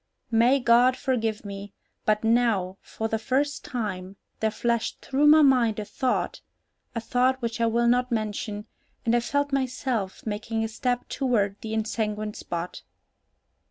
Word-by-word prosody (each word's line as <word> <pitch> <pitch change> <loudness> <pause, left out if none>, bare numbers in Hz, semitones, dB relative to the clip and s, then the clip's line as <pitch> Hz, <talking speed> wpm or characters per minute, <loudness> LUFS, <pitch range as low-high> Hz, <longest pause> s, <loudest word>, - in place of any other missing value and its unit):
May 240 +4 +4
God 245 +1 +5
forgive 225 -5 -1
me, 200 0 -7 0.3
but 215 0 +2
now, 225 -5 +2
for 220 - -4
the 220 0 -1
first 275 +6 0
time, 200 -9 -4 0.2
there 220 - +2
flashed 235 +1 -1
through 280 +2 +2
my 305 +1 +8
mind 245 -6 +4
a 210 - -3
thought, 250 +5 -1 0.5
a - - 0
thought 250 +3 +1
which 235 -1 -3
I 230 - +4
will 235 +1 +2
not 250 +1 +2
mention, 210 -1 -2 0.4
and 230 +1 +3
I - - +4
felt 285 +4 -1
myself 255 -6 -2
making 225 +1 -2
a - - 0
step 245 +2 -2
toward 225 -7 0
the 220 0 -4
ensanguined 215 -1 -2
spot. 170 +1 -5
230 Hz, 155 wpm, -26 LUFS, 215-250 Hz, 0.5 s, my